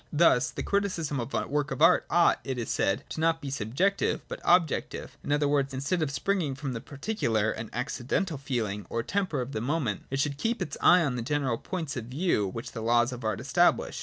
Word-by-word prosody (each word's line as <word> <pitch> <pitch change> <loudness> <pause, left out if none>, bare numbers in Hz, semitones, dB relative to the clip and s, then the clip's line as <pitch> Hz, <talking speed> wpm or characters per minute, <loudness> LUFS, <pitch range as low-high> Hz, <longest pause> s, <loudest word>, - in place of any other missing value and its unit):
Thus 145 -5 +4
the - - -5
criticism 180 -8 -1
of 120 +2 -4
a - - 0
work 145 0 -1
of - - -4
art 165 +3 +5
ought, 175 0 +4
it 130 -2 -3
is 115 - -3
said, 95 - +1
to - - -6
be - - -2
not 165 -1 +1
subjective, 140 - 0
but - - -6
objective; 170 -5 +1
in - - -4
other 145 0 +2
words, 140 -2 +1
instead 140 +7 -1
of 155 - +1
springing 160 -1 -1
from 140 -1 -4
the 115 - -5
particular 125 - -1
and 110 0 -6
accidental 140 - -2
feeling 110 -7 -3
or 115 - -2
temper 185 -4 -1
of 125 +2 -5
the 110 - -3
moment, 125 - -1
it 135 - -2
should 140 0 -1
keep 230 +7 0
its 180 -5 -3
eye 175 0 +6
on 135 -5 -1
those 115 - -4
general 135 -4 0
points 160 -7 -4
of 120 -4 -4
view 130 - 0
which 115 +5 -6
the 115 - -6
laws 120 +2 +3
of 125 -1 -7
art 110 -3 -1
establish. - - +2
140 Hz, 220 wpm, -28 LUFS, 120-165 Hz, -, eye